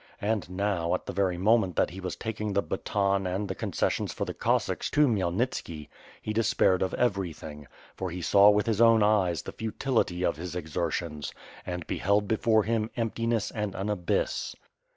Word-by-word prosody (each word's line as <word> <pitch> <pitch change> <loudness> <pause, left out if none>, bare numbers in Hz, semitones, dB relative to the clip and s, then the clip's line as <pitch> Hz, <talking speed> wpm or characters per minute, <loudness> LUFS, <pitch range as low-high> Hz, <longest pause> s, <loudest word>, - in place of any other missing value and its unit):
And 105 -5 -1
now, 90 -2 0
at - - -6
the - - -5
very 95 -2 +1
moment 100 -2 +3
that - - +2
he 95 - -8
was 90 -2 -4
taking 105 -2 -4
the 100 - +1
baton 100 0 0
and. 95 +3 -2
the - - -3
concessions - - -1
for - - -3
the - - -5
Cossacks - - 0
to 150 0 +4
Khmyelnitski, 90 - -1 0.3
he 110 - -2
de 115 - +2
spaired 95 -3 +2
of 95 - 0
everything 85 - -2
— - - -25
^for 95 -2 -3
he 90 - -5
saw 100 +3 +6
with 105 0 +3
his 110 -1 +1
own 115 -2 +6
eyes 95 -5 +2
the - - -6
futility 110 -5 -1
of 85 - 0
his 90 +1 -6
exertions, 80 -2 -3 0.3
and 90 -2 -4
beheld 100 +2 +1
before 110 0 +3
him 110 +1 0
emptiness 115 -1 -1
and 105 -3 -3
an 100 +3 -2
abyss. 90 -4 -1
100 Hz, 185 wpm, -28 LUFS, 90-110 Hz, 0.3 s, saw